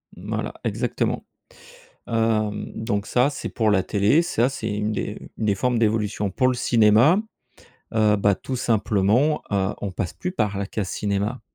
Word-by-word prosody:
Voilà, -, -, -4 dB
exactement, -, -, -1 dB, 0.8 s
hem, 110 Hz, -2 st, 0 dB
donc 105 Hz, -2 st, -2 dB
ça 125 Hz, +3 st, +3 dB
c'est 150 Hz, -, -5 dB
pour 110 Hz, -2 st, +1 dB
la 95 Hz, -2 st, +3 dB
télé, 105 Hz, -, +3 dB
ça 130 Hz, -8 st, +1 dB
c'est 125 Hz, -5 st, -5 dB
une 105 Hz, +1 st, -1 dB
des -, -, -3 dB, 0.2 s
une 110 Hz, -, -2 dB
des 100 Hz, -2 st, +2 dB
formes 125 Hz, +4 st, 0 dB
d'évolution. 105 Hz, -2 st, 0 dB
Pour 130 Hz, +7 st, +2 dB
le 130 Hz, -, +1 dB
cinéma, 120 Hz, -, +4 dB, 0.8 s
heu, 105 Hz, -1 st, +4 dB
bah, 100 Hz, 0 st, +3 dB
tout 130 Hz, +6 st, -5 dB
simplement, 115 Hz, +4 st, +2 dB
heu, 100 Hz, -1 st, 0 dB
on 100 Hz, -, -3 dB
passe 90 Hz, -1 st, -4 dB
plus 180 Hz, -, -4 dB
par 105 Hz, -, -1 dB
la 100 Hz, 0 st, -2 dB
case 100 Hz, -1 st, -3 dB
cinéma. 105 Hz, +4 st, -2 dB
110 Hz, 165 wpm, -23 LUFS, 100-120 Hz, 0.8 s, cinéma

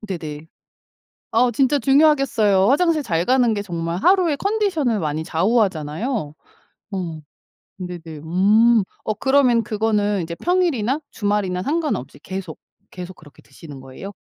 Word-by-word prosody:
네네. 160 Hz, -7 st, -7 dB, 0.9 s
어 240 Hz, +2 st, +3 dB
진짜 270 Hz, +4 st, +2 dB
중요하겠어요. 270 Hz, -8 st, +3 dB
화장실 310 Hz, +1 st, +2 dB
잘 170 Hz, -6 st, 0 dB
가는 250 Hz, -2 st, +3 dB
게 205 Hz, -, -2 dB
정말 170 Hz, -3 st, -4 dB
하루의 360 Hz, -6 st, +3 dB
컨디션을 380 Hz, -, 0 dB
많이 155 Hz, -1 st, -2 dB
좌우하잖아요. 185 Hz, -, -1 dB, 0.6 s
어. 170 Hz, -5 st, -4 dB, 0.6 s
네네 180 Hz, -2 st, -7 dB, 0.2 s
음. 210 Hz, +6 st, +4 dB, 0.2 s
어 215 Hz, -, -1 dB
그러면 265 Hz, -4 st, +3 dB
그거는 210 Hz, -2 st, 0 dB
인제 170 Hz, +1 st, -5 dB
평일이나 315 Hz, -, 0 dB
주말이나 205 Hz, -3 st, -1 dB
상관없이 285 Hz, -, -2 dB
계속, 185 Hz, 0 st, -7 dB, 0.3 s
계속 180 Hz, 0 st, -8 dB
그렇게 145 Hz, -3 st, -18 dB
드시는 145 Hz, -5 st, -13 dB
거예요? 135 Hz, +10 st, -10 dB
210 Hz, 305 characters per minute, -21 LUFS, 175-265 Hz, 0.9 s, 음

